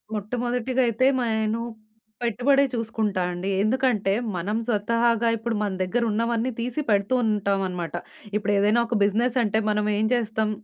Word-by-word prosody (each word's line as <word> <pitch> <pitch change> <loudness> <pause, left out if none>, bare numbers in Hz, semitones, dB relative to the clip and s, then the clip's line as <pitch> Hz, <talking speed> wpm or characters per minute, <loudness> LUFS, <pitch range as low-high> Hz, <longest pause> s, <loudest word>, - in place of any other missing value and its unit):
మొట్టమొదటిగా 245 +4 -1
అయితే 230 +3 +1
మ - - 0 0.2
ఎను 225 +2 -1 0.6
పెట్టుబడే 250 +5 +3
చూసుకుంటా 220 -4 -1
అండి. 180 +2 -4
ఎందుకంటే, 220 -3 +1 0.2
మనం 195 +5 -2
స్వతహాగా 230 +1 +1
ఇప్పుడు 225 +1 -3
మన 205 -1 0
దగ్గరున్నవన్నీ 230 +3 0
తీసి 250 +5 -2
పెడుతూ 200 +2 +2
ఉంటామనమాట. 195 -6 -1 0.4
ఇప్పుడేదైనా 205 +2 +2
ఒక 235 - -1
బిజినెసంటే 225 +1 +1
మనమేం 210 0 +1
చేస్తాం, 220 -2 0
220 Hz, 120 wpm, -24 LUFS, 205-235 Hz, 0.6 s, పెట్టుబడే